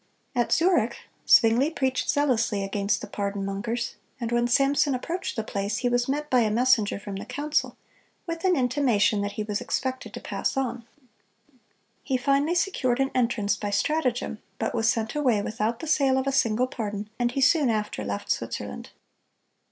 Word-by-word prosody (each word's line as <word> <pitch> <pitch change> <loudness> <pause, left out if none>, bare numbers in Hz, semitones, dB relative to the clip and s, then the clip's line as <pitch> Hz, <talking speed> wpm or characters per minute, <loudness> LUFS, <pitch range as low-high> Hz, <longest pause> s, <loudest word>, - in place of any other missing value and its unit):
At 240 -1 +1
Zurich, 330 - +3 0.3
Zwingle 235 +6 +6
preached 265 -5 -1
zealously 230 -8 +1
against 200 +1 -1
the 215 - -6
pardon 200 -1 -3
mongers; 225 +5 -3 0.2
and 235 -1 -3
when 240 0 +2
Samson 275 +2 +3
approached 340 +8 -4
the 220 - -2
place, 200 0 -2
he 245 - 0
was 245 +1 +1
met 295 +2 -1
by 255 -3 +3
a 220 -2 +2
messenger 230 -2 +2
from 200 -1 -6
the 195 - -6
council, 295 +1 -1 0.5
with 335 0 -5
an 370 -1 +3
intimation 245 -6 +2
that 205 0 -3
he 215 - -3
was 210 -1 -3
expected 260 0 -3
to - - -5
pass - - -3
on. 245 -3 -2 1.1
He 260 0 0
finally 280 +6 +1
secured 270 -10 +1
an 270 0 +1
entrance 230 -5 +1
by 205 - -4
stratagem, 250 -1 0 0.2
but - - -2
was 225 -1 +2
sent 220 -1 -1
away 255 -8 +2
without 220 +2 -2
the - - -4
sale 275 -4 +3
of 265 - 0
a 275 - +1
single 245 -3 +2
pardon, 210 -5 -4
and 240 0 +1
he 275 - -1
soon 290 -1 +4
after 210 - -2
left 100 0 -3
Switzerland. - - -4
240 Hz, 175 wpm, -26 LUFS, 215-275 Hz, 1.1 s, Zwingle